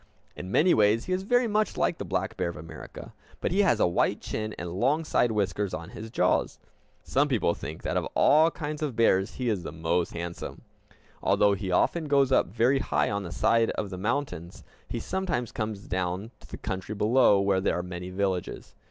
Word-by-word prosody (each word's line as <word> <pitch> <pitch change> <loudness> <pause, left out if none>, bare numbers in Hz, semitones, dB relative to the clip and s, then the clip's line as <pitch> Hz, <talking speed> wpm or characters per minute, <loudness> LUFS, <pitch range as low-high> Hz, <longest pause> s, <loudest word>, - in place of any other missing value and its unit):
In 90 - -7
many 170 - +4
ways 105 +2 +3
he 185 - -1
is 185 - 0
very 245 +5 +2
much 215 0 0
like 170 - 0
the - - -3
black 95 0 -2
bear 90 -2 -1
of 85 - -8
America, 80 +2 -10 0.3
but - - -1
he 195 +3 +3
has 170 - +3
a - - +4
white 85 - +1
chin 110 0 -4
and 90 -1 -5
long 150 +7 +2
side 120 -6 +2
whiskers 100 -2 -1
on 85 +4 -8
his 110 +1 -8
jaws. 90 -5 +1 0.5
Some 145 +2 +1
people 115 -10 +1
think - - -8
that - - -1
of - - -1
all 155 +3 +5
kinds 150 -2 -5
of 145 -6 -2
bears 100 -4 +2
he 125 - -3
is 105 -5 0
the 85 - -6
most 80 +2 -1
handsome. 85 0 -6 0.6
Although 100 -1 +3
he 100 -1 -4
often 160 - +2
goes 140 -2 +3
up 130 - +4
very 120 +7 +2
high 75 - 0
on 100 0 -1
the 90 -3 -7
side 115 +4 +2
of 100 -2 -3
the 95 - -5
mountains, 105 - -3 0.2
he - - -4
sometimes 170 -11 -2
comes 110 -3 -4
down 95 +3 -3
to - - -16
the - - -8
country 95 +3 -4
below, 105 0 +4
where 100 -1 +2
there - - +1
are 90 - -2
many 90 0 -6
villages. 95 -1 -3
105 Hz, 210 wpm, -27 LUFS, 90-135 Hz, 0.6 s, all